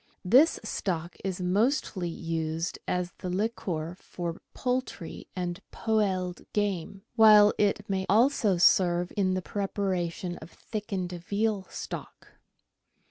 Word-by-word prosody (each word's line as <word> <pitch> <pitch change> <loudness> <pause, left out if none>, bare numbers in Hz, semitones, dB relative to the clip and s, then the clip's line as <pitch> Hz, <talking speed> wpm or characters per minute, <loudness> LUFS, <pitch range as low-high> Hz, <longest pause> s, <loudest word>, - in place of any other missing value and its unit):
This 260 - +5
stock 175 -5 -3
is 190 -1 -2
mostly 195 -1 +1
used 165 0 -3
as 180 -1 -1
the 180 - -4
liquor 180 -4 -2
for 170 -1 -5
poultry 250 -9 -3
and 175 -1 -3
poeled 190 -5 0
game, 195 -2 -2
while 210 -2 +8
it 205 -1 +1
may 190 -1 -1
also 220 -2 +4
serve 175 0 +4
in 185 -2 +2
the 185 - -2
preparation 185 -3 -2
of 160 - -11
thickened 195 -5 -4
veal 200 +3 -1
stock. - - -7
185 Hz, 115 wpm, -28 LUFS, 175-210 Hz, -, while